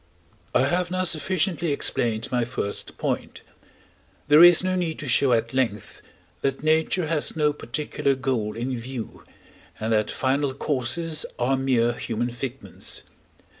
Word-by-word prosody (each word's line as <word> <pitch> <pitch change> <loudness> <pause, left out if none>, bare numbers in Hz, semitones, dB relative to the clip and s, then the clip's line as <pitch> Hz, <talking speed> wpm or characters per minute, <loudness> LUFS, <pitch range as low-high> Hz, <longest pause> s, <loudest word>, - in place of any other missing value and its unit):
I - - +5
have 175 +5 +1
now 185 0 0
sufficiently 170 0 0
explained 120 -4 -1
my 125 -1 +2
first 115 -4 -4
point. - - -3 0.9
There 150 +3 +8
is 175 0 +8
no 185 0 0
need 170 -3 -1
to 145 - -6
show 135 +1 +3
at 115 0 +1
length, 115 -6 -2 0.4
that 135 +1 -1
nature 160 +3 +2
has 155 -1 0
no 150 -2 +2
particular 140 0 -1
goal 120 -5 -2
in 125 +2 -2
view, 120 0 -7 0.6
and 110 +1 0
that 105 -1 +2
final 135 0 0
causes 150 +4 -1
are 125 +2 +2
mere 125 -3 +2
human 120 +1 -3
figments. 125 +1 -5
135 Hz, 140 wpm, -24 LUFS, 120-155 Hz, 0.9 s, There